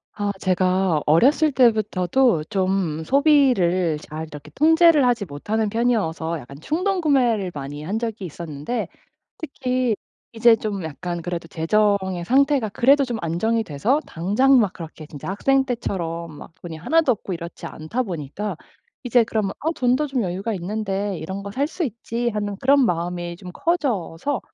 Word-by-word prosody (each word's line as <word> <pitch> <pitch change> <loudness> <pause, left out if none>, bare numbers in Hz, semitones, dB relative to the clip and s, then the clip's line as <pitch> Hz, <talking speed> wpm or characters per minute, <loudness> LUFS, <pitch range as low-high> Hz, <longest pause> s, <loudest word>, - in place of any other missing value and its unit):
아 205 -1 -1
제가 185 -3 +1
어렸을 275 - +4
때부터도 220 - +2
좀 185 -4 -1
소비를 245 - +3
잘 155 +1 -7
이렇게 150 -2 -11
통제를 320 -2 +5
하지 240 -4 +1
못하는 210 +8 -2
편이어서 200 -8 0
약간 140 +2 -12
충동구매를 285 - +1
많이 145 +1 -6
한 195 +7 -2
적이 225 -3 -4
있었는데 160 +5 -4 0.5
특히 255 -6 -1 0.4
이제 230 0 +5
좀 205 -4 -4
약간 175 +3 -5
그래도 170 0 -4
재정의 190 +2 +1
상태가 270 - +2
그래도 275 +7 +4
좀 240 -3 -4
안정이 220 +8 0
돼서 215 - 0
당장 215 +11 +3
막 210 -6 +2
그렇게 160 -2 -9
진짜 145 -2 -9
학생 270 +7 +2
때처럼 170 -9 -3
막 - - -12
돈이 165 -2 -7
1 325 - +2
도 270 - +3
없고 195 -4 -5
이렇지 170 0 -8
않다 165 +11 -3
보니까 185 - -5 0.5
이제 245 -2 +3
그러면 215 -3 -1
'아 320 +2 0
돈도 255 +4 +2
좀 265 -3 -1
여유가 195 +4 -2
있는데 195 0 -3
이런 190 +5 -5
거 200 - -6
살 270 +7 0
수 335 +3 -3
있지.' 235 -1 -3
하는 205 -2 -3
그런 275 0 +5
마음이 175 -1 -2
좀 180 0 -10
커져서 270 - -1
205 Hz, 320 characters per minute, -22 LUFS, 170-250 Hz, 0.5 s, 통제를